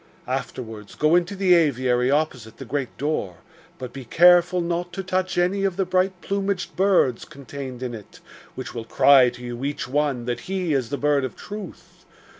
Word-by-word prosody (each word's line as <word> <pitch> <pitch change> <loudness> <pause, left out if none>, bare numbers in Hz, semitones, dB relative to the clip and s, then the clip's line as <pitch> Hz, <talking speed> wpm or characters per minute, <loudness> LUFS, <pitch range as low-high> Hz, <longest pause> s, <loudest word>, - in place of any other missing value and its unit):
Afterwards, 110 -4 -5
go 155 +1 +2
into 180 +3 +1
the 190 -2 +4
aviary 130 -6 +2
opposite 135 -7 -1
the 135 - -8
great 135 0 -4
door, 140 - -2 0.4
but 125 -1 -8
be 135 - -7
careful 175 +6 +5
not 175 +1 -2
to 195 - -4
touch 185 0 -1
any 185 +3 +1
of 195 -2 0
the 195 - +1
bright 185 0 0
plumaged 195 -1 -2
birds 185 -11 +2
contained 135 -2 -8
in 125 -1 -4
it, 105 -3 -11 0.4
which 130 -3 -7
will 115 - -5
cry 130 +1 +6
to 125 - -12
you, 120 +1 -6
each 145 -2 -3
one, 135 -3 0
that 120 0 -2
he 185 -4 -1
is 130 -4 0
the 140 - -2
Bird 145 -1 +2
of 130 - -4
Truth. 205 -3 -10
145 Hz, 185 wpm, -23 LUFS, 125-180 Hz, 0.4 s, cry